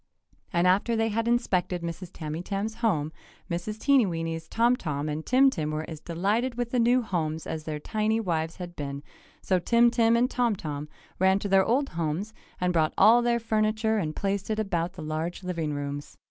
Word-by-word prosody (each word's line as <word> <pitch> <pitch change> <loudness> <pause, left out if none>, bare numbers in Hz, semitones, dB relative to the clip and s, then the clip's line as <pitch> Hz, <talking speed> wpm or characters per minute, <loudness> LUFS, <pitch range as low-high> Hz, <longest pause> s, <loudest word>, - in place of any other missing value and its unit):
And 175 -1 +2
after 200 +6 +3
they 225 0 +1
had 225 +2 -1
inspected 185 -7 0
Mrs. 170 +1 -5
Tamytam's 180 +8 -4
home, 160 -10 +1 0.4
Mrs. 175 +5 -3
Teenyweeny's 165 - +1
Tom 235 +2 +3
Tom 150 -8 -3
and 150 +1 -3
Tim 265 +5 +4
Tim 155 -9 -2
were 155 +1 -3
as 160 -2 -7
delighted 205 +10 -1
with 240 -1 -3
the 250 - +1
new 245 +2 +4
homes 160 -6 -2
as 155 -1 -5
their 155 -1 -3
tiny 215 +6 0
wives 165 -6 -1
had 175 -1 -8
been, 140 -1 -5 0.4
so 185 -1 +2
Tim 235 +6 +4
Tim 230 -1 +3
and 245 +2 +3
Tom 245 -4 +1
Tom 150 -4 -5 0.3
ran 190 +1 +4
to 200 - -3
their 195 -1 +5
old 270 +7 +1
homes 170 +6 -3 0.3
and 180 0 +1
brought 160 -2 +1
all 225 +4 +7
their 240 0 +2
furniture 220 0 +1
and 155 -5 -3
placed 200 0 -2
it 215 - 0
about 180 -5 -1
the 170 - -8
large 160 +4 -3
living 165 -4 -2
rooms. 145 0 -5
190 Hz, 190 wpm, -27 LUFS, 160-225 Hz, 0.4 s, all